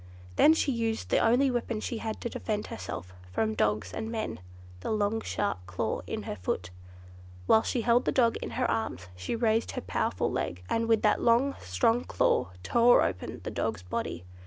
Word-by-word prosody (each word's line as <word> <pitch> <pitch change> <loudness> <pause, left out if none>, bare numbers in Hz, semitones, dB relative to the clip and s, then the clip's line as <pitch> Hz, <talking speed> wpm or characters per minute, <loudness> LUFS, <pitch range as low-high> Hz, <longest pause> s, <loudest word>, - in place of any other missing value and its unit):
Then 315 - +6
she 290 - +1
used 225 -2 -2
the - - +3
only 255 +4 +4
weapon 235 -2 -2
she 225 +1 -3
had 220 -1 -4
to 235 - -2
defend 210 -2 -3
herself 90 0 -6 0.2
from 110 +4 0
dogs 105 0 0
and 220 - -4
men—the 90 - -6
long 215 +1 +1
sharp 205 - -1
claw 90 +1 -2
in - - -4
her - - -4
foot. 90 0 -3 0.7
Whilst 220 - +4
she 245 - 0
held 235 +2 +3
the - - +2
dog 235 -3 +3
in - - -5
her 255 - +2
arms, 95 - -2
she 90 - -3
raised 225 -1 +1
her - - -3
powerful 90 -2 -1
leg, 90 +1 -3
and 230 0 0
with 225 -1 +3
that 210 - +3
long, 245 +4 +4
strong 225 - +1
claw, 90 -1 +1
tore 235 - +5
open 90 -2 -3
the - - -4
dog's 90 - -2
body. 90 -1 -4
220 Hz, 185 wpm, -29 LUFS, -, 0.7 s, Then